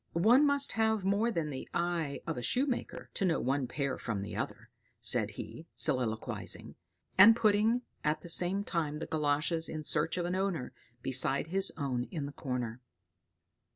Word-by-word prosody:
"One 235 Hz, -, +5 dB
must 285 Hz, 0 st, +2 dB
have 220 Hz, -3 st, +1 dB
more 200 Hz, +4 st, +2 dB
than 165 Hz, -9 st, -2 dB
the 130 Hz, -, -7 dB
eye 170 Hz, -5 st, -1 dB
of 165 Hz, -, -3 dB
a 125 Hz, -, -4 dB
shoemaker 250 Hz, -, -2 dB
to -, -, -2 dB
know 175 Hz, -4 st, +2 dB
one 135 Hz, +1 st, 0 dB
pair 140 Hz, +1 st, -3 dB
from 105 Hz, -4 st, -3 dB
the 100 Hz, -, -7 dB
other," -, -, -5 dB, 0.3 s
said -, -, +2 dB
he, -, -, -8 dB
soliloquizing; 110 Hz, -4 st, -1 dB, 0.5 s
and 225 Hz, +4 st, +10 dB
putting, 220 Hz, +2 st, +2 dB, 0.2 s
at 150 Hz, +1 st, 0 dB
the -, -, -10 dB
same 180 Hz, +4 st, +2 dB
time, 155 Hz, -6 st, -2 dB
the 160 Hz, -, -5 dB
galoshes 155 Hz, +2 st, 0 dB
in 155 Hz, -1 st, -5 dB
search 155 Hz, +3 st, +1 dB
of 175 Hz, -, -1 dB
an 175 Hz, -, -2 dB
owner, 185 Hz, -8 st, -2 dB, 0.3 s
beside 135 Hz, +3 st, +1 dB
his 195 Hz, +2 st, +6 dB
own 130 Hz, -4 st, -2 dB
in 155 Hz, -2 st, -5 dB
the 140 Hz, -, -6 dB
corner. 125 Hz, -3 st, -4 dB
165 Hz, 170 wpm, -31 LUFS, 140-200 Hz, 0.5 s, and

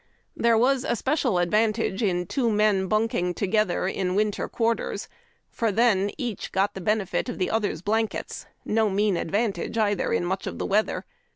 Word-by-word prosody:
There 230 Hz, -1 st, +3 dB
was 255 Hz, +2 st, +3 dB
a 240 Hz, -, 0 dB
special 260 Hz, -, 0 dB
advantage 210 Hz, +3 st, +1 dB
in 180 Hz, -4 st, 0 dB
two 235 Hz, +6 st, 0 dB
men 210 Hz, -2 st, +2 dB
bunking 215 Hz, -4 st, 0 dB
together 200 Hz, -2 st, +1 dB
in 185 Hz, -1 st, -1 dB
winter 210 Hz, 0 st, 0 dB
quarters, 230 Hz, 0 st, -1 dB, 0.4 s
for 230 Hz, -2 st, 0 dB
then 205 Hz, -2 st, +3 dB
each 240 Hz, -7 st, -4 dB
got 195 Hz, +2 st, +1 dB
the 190 Hz, -, -7 dB
benefit 210 Hz, +4 st, 0 dB
of 245 Hz, -, -5 dB
the 185 Hz, -, -1 dB
other's 205 Hz, -7 st, -1 dB
blankets 220 Hz, +2 st, -2 dB
— -, -, -42 dB
no 220 Hz, -1 st, +3 dB
mean 200 Hz, 0 st, +1 dB
advantage, 200 Hz, +3 st, -1 dB
either, 205 Hz, -3 st, +1 dB
in -, -, +1 dB
mucli 190 Hz, +2 st, -2 dB
of -, -, -5 dB
the -, -, -3 dB
weather. 210 Hz, +2 st, 0 dB
210 Hz, 175 wpm, -25 LUFS, 190-225 Hz, 0.4 s, There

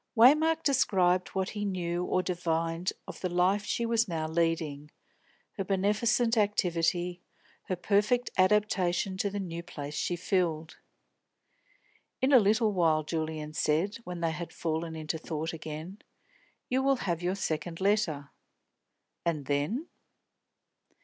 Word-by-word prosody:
Waymark 310 Hz, +7 st, +6 dB
described 185 Hz, -9 st, +3 dB
what 190 Hz, 0 st, 0 dB
he 205 Hz, -1 st, -4 dB
knew 175 Hz, -3 st, -1 dB
or 185 Hz, 0 st, 0 dB
divined 165 Hz, -1 st, -1 dB, 0.2 s
of -, -, -8 dB
the 185 Hz, -, -1 dB
life 180 Hz, +4 st, +2 dB
she 235 Hz, -, -1 dB
was 230 Hz, 0 st, +2 dB
now 160 Hz, -3 st, -2 dB
leading, 160 Hz, -3 st, -1 dB, 0.7 s
her -, -, +1 dB
beneficent 220 Hz, +5 st, +1 dB
activity, 180 Hz, -3 st, +1 dB, 0.4 s
her 185 Hz, -, -1 dB
perfect 210 Hz, +7 st, +1 dB
adaptation 190 Hz, -1 st, +2 dB
to 200 Hz, -, 0 dB
the 200 Hz, +1 st, -4 dB
new 170 Hz, -3 st, -4 dB
place 150 Hz, -4 st, -7 dB
she 175 Hz, +4 st, -1 dB
filled. 165 Hz, -3 st, -1 dB, 1.4 s
"In 265 Hz, +2 st, +2 dB
a 255 Hz, -, +9 dB
little 215 Hz, +1 st, +3 dB
while," 160 Hz, -4 st, +3 dB
Julian 155 Hz, -1 st, -3 dB
said, 160 Hz, +8 st, +1 dB
when 180 Hz, -7 st, -7 dB
they 165 Hz, -1 st, +1 dB
had 170 Hz, +1 st, -6 dB
fallen 160 Hz, 0 st, -3 dB
into 160 Hz, 0 st, -3 dB
thought 160 Hz, 0 st, -4 dB
again, 160 Hz, +5 st, -7 dB, 0.7 s
"you 260 Hz, +1 st, +1 dB
will 275 Hz, 0 st, +3 dB
have 170 Hz, -3 st, -1 dB
your 180 Hz, +2 st, 0 dB
second 165 Hz, -2 st, -3 dB
letter. 190 Hz, -8 st, 0 dB, 0.9 s
And 155 Hz, -5 st, -1 dB
then?" 145 Hz, -, -1 dB
180 Hz, 135 wpm, -29 LUFS, 165-205 Hz, 1.4 s, a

